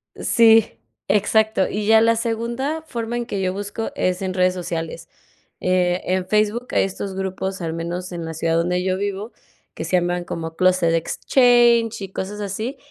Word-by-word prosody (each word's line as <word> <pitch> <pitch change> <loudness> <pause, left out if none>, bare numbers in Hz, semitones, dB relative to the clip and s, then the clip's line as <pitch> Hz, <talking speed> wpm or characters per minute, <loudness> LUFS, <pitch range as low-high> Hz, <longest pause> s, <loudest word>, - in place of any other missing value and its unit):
Sí, 225 - +4 0.3
exacto. 210 0 +2
Y 210 0 -3
ya 220 0 +6
la 230 0 +4
segunda 235 +6 -2
forma 235 -3 -4
en 240 - -3
que 200 -4 -3
yo 185 -1 0
busco 205 +3 -4
es 185 0 0
en 190 -1 -2
redes 185 0 +2
sociales. 165 -2 -5 0.5
Eh, 180 0 +1
en 185 0 0
Facebook 215 +4 +1
hay - - +3
estos 195 0 -4
grupos 190 0 -4
al 165 -1 -3
menos 170 +2 -4
en 170 -2 -5
la 160 - -5
ciudad 165 +1 0
donde 180 +2 0
yo 185 0 0
vivo, 200 +3 -4 0.4
que - - -6
se 180 +3 +2
llaman 175 0 -1
como 165 -2 -6
Closet 185 -2 +3
Exchanges 235 - +3
y 195 -1 -6
cosas 205 +2 -5
así, 215 +7 -4
190 Hz, 175 wpm, -21 LUFS, 180-225 Hz, 0.5 s, ya